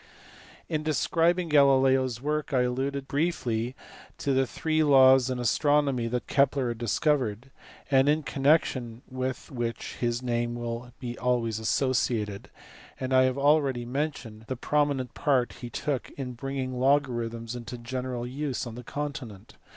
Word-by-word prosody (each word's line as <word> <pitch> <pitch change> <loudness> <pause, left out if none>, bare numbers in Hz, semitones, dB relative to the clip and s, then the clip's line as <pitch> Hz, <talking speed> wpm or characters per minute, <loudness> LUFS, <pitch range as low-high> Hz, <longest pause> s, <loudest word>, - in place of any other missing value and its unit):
In 155 -1 -1
describing 165 +3 +1
Galileo 135 -3 +5
s 120 -3 -4
work 150 +1 -2
I 130 - +4
alluded 135 +2 -2
briefly 130 -6 -1 0.4
to 140 - 0
the 130 0 +2
three 155 +3 0
laws 130 -3 +6
in 130 - -2
astronomy 140 0 +2
that 120 +1 -2
Kepler 140 -2 +2
had 115 -1 -4
discovered, 125 -1 0 0.4
and 135 +1 +5
in 155 +1 +2
connec 145 +4 +3
tion 120 -2 -6
with 130 0 -4
which 120 -3 -4
his 120 +1 -1
name 120 -1 -1
will 120 +1 -5
be 120 -3 -6
always 120 -3 0
associated; 110 -4 0 0.5
and 130 0 -2
I 130 0 +6
have 130 +1 0
already 140 -4 +2
mentioned 125 -5 -4
the 130 - -3
prominent 145 -2 0
part 130 -4 +1
he 120 - -6
took 135 +2 -3
in 130 -3 -4
bring 135 +3 -5
ing 130 -1 -3
logarithms 120 -4 0
into 120 0 -7
general 125 0 -4
use 135 +1 -3
on 120 - -7
the 125 +2 -8
continent. 130 -8 -6
130 Hz, 150 wpm, -27 LUFS, 120-140 Hz, 0.5 s, laws